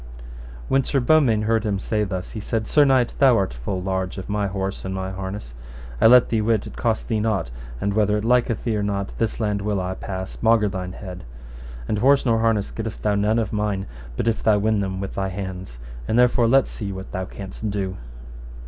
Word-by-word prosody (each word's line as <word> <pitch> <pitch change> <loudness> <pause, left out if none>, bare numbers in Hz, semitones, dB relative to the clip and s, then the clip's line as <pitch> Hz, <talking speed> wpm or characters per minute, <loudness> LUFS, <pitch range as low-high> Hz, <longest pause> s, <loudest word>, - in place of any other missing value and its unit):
When 135 0 +3
Sir 135 - 0
Beaumains 120 -6 +3
heard 115 0 +2
him 105 -3 0
say 105 +2 -1
thus, 95 -2 -4
he 110 - -5
said, 110 +1 -2
Sir 150 +4 +4
knight, 130 -3 +3
thou 130 -4 +6
art 95 - 0
full 90 +10 -4
large 95 -1 -2
of 95 - -7
my 105 0 0
horse 95 0 -3
and 95 0 -4
my 95 0 -3
harness; 95 -8 -6 0.5
I - - +8
let 125 +1 +7
thee 110 -2 +1
wit 110 -1 +1
it - - -9
cost 115 -3 -1
thee 110 -3 0
nought, 105 - -1 0.3
and 100 - -1
whether 105 0 +2
it 105 - -3
liketh 120 -1 +2
thee 115 -3 0
or 105 - 0
not, 100 -1 -2
this 115 0 -1
laund 105 -2 0
will 100 -1 -1
I 90 0 -2
pass 95 0 -6
maugre 110 -2 +4
thine 95 -1 -5
head. 90 -2 -8 0.6
And 105 - 0
horse 135 +4 +4
nor 115 -2 +3
harness 110 -3 +1
gettest 110 -1 -6
thou 105 - +2
none 105 +2 +2
of 110 -3 -1
mine, 105 -2 -1 0.3
but - - -1
if 115 - +1
thou 110 -2 +4
win 110 +1 +1
them 95 -1 -2
with 100 - -5
thy 95 0 -1
hands; 95 -7 -6 0.3
and 110 - +1
therefore 120 -1 +4
let 135 +3 +5
see 100 -3 -6
what 95 0 -7
thou 95 0 -3
canst 100 +3 -6
do. 95 -2 -3
105 Hz, 220 wpm, -23 LUFS, 95-115 Hz, 0.6 s, I